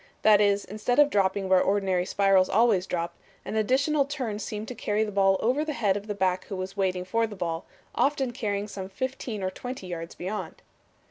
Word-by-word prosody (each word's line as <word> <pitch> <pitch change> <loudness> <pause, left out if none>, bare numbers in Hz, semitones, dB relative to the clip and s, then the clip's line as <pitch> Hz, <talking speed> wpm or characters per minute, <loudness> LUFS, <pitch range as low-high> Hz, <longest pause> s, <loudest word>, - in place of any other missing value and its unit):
That 210 -1 +6
is, 205 -1 +2
instead 215 +5 -2
of 290 0 +6
dropping 195 0 +1
where 185 -1 +5
ordinary 190 -2 +1
spirals 195 -2 +3
always 215 -4 +3
drop, 170 -1 -2 0.3
an - - -4
additional 275 +7 +2
turn 255 -7 -4
seemed 215 0 -5
to - - -4
carry 210 -2 0
the 215 - -3
ball 195 -1 +3
over 255 +6 +2
the 310 -1 -3
head 210 -7 +1
of 205 +1 -5
the 210 - -3
back 185 -2 0
who 200 - -6
was 185 +1 -5
waiting 185 -2 0
for 225 +5 +1
the 210 - -9
ball, 170 -3 -3 0.3
often 275 -3 +1
carrying 210 -4 -2
some 190 -2 -7
fifteen 240 -1 -4
or 185 - -1
twenty 250 +1 -7
yards 170 -2 -6
beyond." 200 +4 -5
205 Hz, 205 wpm, -27 LUFS, 190-230 Hz, 0.3 s, That